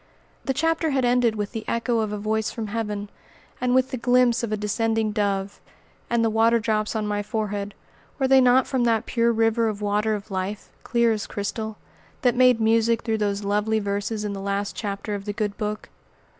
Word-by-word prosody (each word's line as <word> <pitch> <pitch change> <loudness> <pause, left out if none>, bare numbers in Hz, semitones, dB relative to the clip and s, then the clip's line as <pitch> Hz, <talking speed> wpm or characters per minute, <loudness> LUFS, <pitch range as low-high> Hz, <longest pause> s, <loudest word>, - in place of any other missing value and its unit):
The 270 - 0
chapter 325 +2 +1
had 270 -3 +1
ended 245 -2 +3
with 205 -1 -3
the 225 -2 -5
echo 235 0 0
of 215 -2 -1
a 210 - -3
voice 215 +1 -1
from 220 -3 -5
heaven, 210 -2 -3 0.5
and 250 0 +2
with 260 +1 +2
the 260 - -2
glimpse 245 0 +3
of 235 -3 -3
a 215 - 0
descending 220 +1 0
Dove. 200 -2 -1 0.5
And 235 -1 +2
the - - +2
water 225 +1 +4
drops 215 -1 -1
on 215 -1 -1
my 205 0 -1
forehead, 205 -1 -3 0.4
were 265 - +1
they 265 0 +6
not 255 +1 +5
from 260 -3 0
that 225 -2 +2
"pure 235 -1 +2
river 225 0 +2
of 210 -1 -5
water 210 +1 0
of 205 0 -8
life, 190 +2 -4
clear 235 -1 +2
as 215 -2 -2
crystal," 215 +1 -4 0.5
that 245 -2 +4
made 250 -2 +5
music 225 +1 +2
through 225 -1 -1
those 205 -1 -1
lovely 210 +2 +1
verses 205 +1 -2
in 205 - -2
the 195 - -6
last 200 +1 -2
chapter 205 0 -4
of 200 -1 -5
the 205 - -3
good 205 -1 -2
Book? 210 0 -4
220 Hz, 205 wpm, -24 LUFS, 205-235 Hz, 0.5 s, they